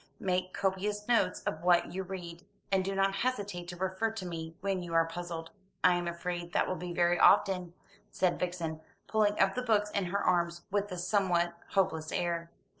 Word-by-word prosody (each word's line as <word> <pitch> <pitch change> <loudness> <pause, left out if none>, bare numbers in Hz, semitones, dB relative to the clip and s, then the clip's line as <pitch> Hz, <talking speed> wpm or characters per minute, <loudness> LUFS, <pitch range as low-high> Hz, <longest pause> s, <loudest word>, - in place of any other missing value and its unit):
Make 185 -1 0
copious 200 +2 -1
notes 215 -7 +2
of 155 - -3
what 175 0 +3
you 190 - -2
read, 180 -2 -7 0.3
and 190 -1 +3
do 195 +1 -2
not 195 0 +2
hesitate 205 -8 -2
to 175 - -6
refer 190 +4 0
to 220 -4 -6
me 165 -2 -5
when 195 -2 -1
you 170 -1 -5
are 165 0 +5
puzzled." 165 -1 -6 0.3
"I 180 - +7
am 175 0 -1
afraid 175 0 -4
that - - +2
will - - 0
be 180 -1 -5
very 175 0 +2
often," 180 -3 +4 0.3
said 180 -2 +1
Vixen, 170 -3 -3 0.2
piling 210 -1 +2
up 195 - +4
the 250 - -2
books 210 -4 +2
in 200 -2 0
her 180 +3 -1
arms 170 -1 +1
with 205 0 0
a 180 - -4
somewhat 175 -2 +1 0.2
hopeless 160 -5 +1
air. 170 -1 -1
180 Hz, 190 wpm, -31 LUFS, 175-195 Hz, 0.3 s, I